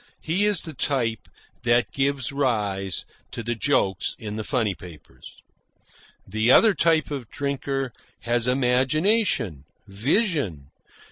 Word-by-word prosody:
He 185 +6 +1
is 205 -5 +3
the 160 - -7
type 125 -5 -1 0.3
that 120 0 +2
gives 140 -2 0
rise 105 - -1 0.2
to 115 - -6
the 120 +2 -1
jokes 105 -6 0
in 105 -2 -6
the 110 - -3
funny 110 -5 0
papers. 85 -4 -14 0.8
The 110 +4 0
other 215 - +7
type 160 -4 +2
of 130 -6 -5
drinker 135 -2 -3 0.3
has 120 0 +1
imagination, 130 - +1 0.2
vision. 110 - -1
125 Hz, 120 wpm, -24 LUFS, 110-145 Hz, 0.8 s, other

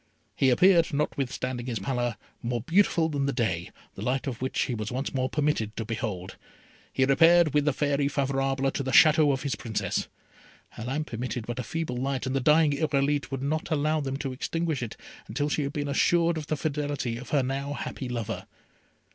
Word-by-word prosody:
He 135 - +3
appeared, 170 +6 +5
notwithstanding 130 -3 -2
his 120 -3 -2
pallor, 120 -3 -2 0.2
more 120 -1 -2
beautiful 170 - +3
than 140 -3 -1
the - - +1
day, 95 -10 -1 0.2
the - - -9
light 125 +5 -1
of 125 -4 -4
which 130 - 0
he 125 - -2
was 110 -2 -4
once 130 +3 -3
more 130 -1 0
permitted 145 -8 -1
to 115 - -2
behold. 105 -5 -4 0.5
He 130 - +2
repaired, 165 +3 +5
with 145 -1 +3
the 150 - +4
Fairy 145 0 +1
Favourable, 135 -1 0
to - - -2
the 135 - -3
Château 155 +1 +6
of 135 -1 -2
his 140 - -1
Princess. 110 -3 -2 0.6
Her 110 - -8
lamp 145 +2 -3
emitted 120 0 -3
but 120 +2 -4
a - - -2
feeble 160 -3 -3
light, 135 +1 -2
and 130 +1 -2
the - - +2
dying 150 +3 +4
Irolite 145 -1 0
would 135 -2 -4
not 155 +4 -1
allow 155 0 +1
them 135 -1 -3
to 135 -2 -4
extinguish 160 +2 -2
it 120 - -5 0.3
until 145 +7 -1
she 150 - 0
had 140 0 -3
been 145 -2 -2
assured 170 +4 +3
of 155 -2 -5
the 155 - -1
fidelity 145 -5 -2
of 125 0 -9
her 140 -3 +2
now 135 +2 -2
happy 135 -2 -5
lover. 115 -5 -4
135 Hz, 200 wpm, -27 LUFS, 125-150 Hz, 0.6 s, Château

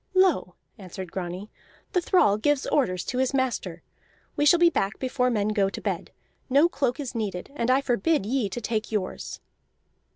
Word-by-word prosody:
"Lo," 370 - +3 0.2
answered 185 -2 -8
Grani, 185 +2 -5 0.4
"the 360 - +3
thrall 335 - +4
gives 290 +4 +1
orders 185 -11 0
to 250 - -2
his 260 +1 +1
master! 235 -10 -2 0.5
We 295 - +2
shall 345 - +7
be 340 0 +5
back 195 -8 -1
before 255 -1 0
men 210 -3 0
go 200 -2 +2
to - - -6
bed. - - -3 0.4
No 285 +6 +5
cloak 270 -6 -1
is 270 -4 -4
needed, 210 -3 -4
and 235 -4 -1
I 260 +2 +4
forbid 275 0 +1
ye 235 -2 0
to 240 - -5
take 220 -1 -2
yours." 205 -4 -4
240 Hz, 175 wpm, -26 LUFS, 200-275 Hz, 0.5 s, shall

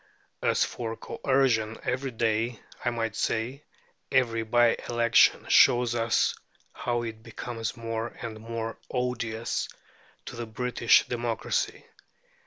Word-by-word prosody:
As - - +3
for 115 -2 -4
coercion 120 -5 +1
every 130 +2 -1
day, 115 0 0 0.2
I 120 - +2
might 115 -2 -2
say, 125 +6 -2 0.5
every 120 -3 +2
bye 120 +1 +4
election 120 -1 +4
shows 120 -1 +5
us 115 -1 +2 0.4
how 120 -1 -1
it 110 -1 -6
becomes 115 0 -5
more 115 0 -3
and 110 -2 -6
more 115 0 -5
odious 115 -3 -2 0.6
to - - -7
the 120 -1 -5
British 120 +1 +3
democracy. 120 -2 -2
115 Hz, 115 wpm, -28 LUFS, 115-120 Hz, 0.6 s, shows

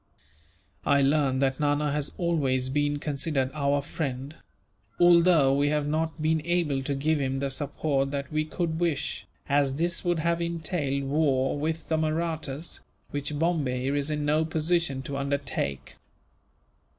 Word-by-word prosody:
I 140 -1 +3
learn 140 -2 +2
that 135 -1 +1
Nana 145 0 +1
has 145 0 -1
always 135 -7 0
been 145 +1 +1
considered 140 -2 -1
our 140 -1 +1
friend; 140 -1 -4 0.6
although 170 -5 +6
we 145 +1 +2
have 150 -1 0
not 160 +2 -1
been 160 0 +2
able 170 -5 0
to 140 +1 -2
give 150 +3 +1
him 135 0 -1
the 135 0 -2
support 140 0 -1
that 140 0 -4
we 155 0 +1
could 160 0 -2
wish, 165 -5 -1 0.2
as 140 -1 +2
this 170 +3 0
would 175 -2 +1
have 170 +1 0
entailed 160 -4 -1
war 135 -2 +1
with 160 +3 -3
the 160 - +1
Mahrattas, 160 -1 -2 0.3
which 145 +1 -2
Bombay 140 -5 0
is 145 +1 0
in 150 -1 -1
no 155 +2 +3
position 160 -3 0
to 140 +1 -4
undertake. 140 - -3
145 Hz, 150 wpm, -27 LUFS, 140-160 Hz, 0.6 s, although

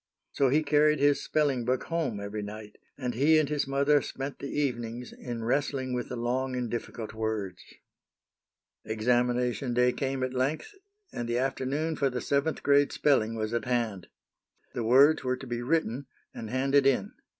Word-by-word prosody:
So 135 -2 +2
he 150 +4 +3
carried 150 0 +4
his 145 0 +3
spelling 140 -5 +1
book 125 +2 0
home 155 -11 -2
every 100 +1 -5
night, 105 +1 -9 0.2
and 125 -3 -3
he 150 +6 +4
and 155 -2 +3
his 145 -1 -1
mother 140 +1 +3
spent 135 +2 -6
the 140 - -5
evenings 120 -4 -3
in 120 -2 -6
wrestling 130 +1 -1
with 125 -1 -3
the 125 - -4
long 130 +2 -1
and 125 -2 -3
difficult 115 -2 -5
words. 110 -5 -3 1.2
Examination 120 +3 0
day 125 0 +4
came 135 0 -2
at 130 0 -2
length, 140 - -1 0.4
and 120 -1 -4
the 120 - 0
afternoon 135 +5 -1
for 140 -2 +1
the 125 -1 -3
seventh 140 +4 -1
grade 145 0 +4
spelling 115 -6 +2
was 110 0 -3
at 115 -2 -1
hand. 115 -7 -1 0.7
The 120 - -2
words 135 +7 +5
were 130 0 0
to 135 - -9
be 120 -1 -3
written, 140 -1 -1 0.3
and 110 - -7
handed 135 +2 +3
in. 125 -8 +1
130 Hz, 170 wpm, -28 LUFS, 120-140 Hz, 1.2 s, words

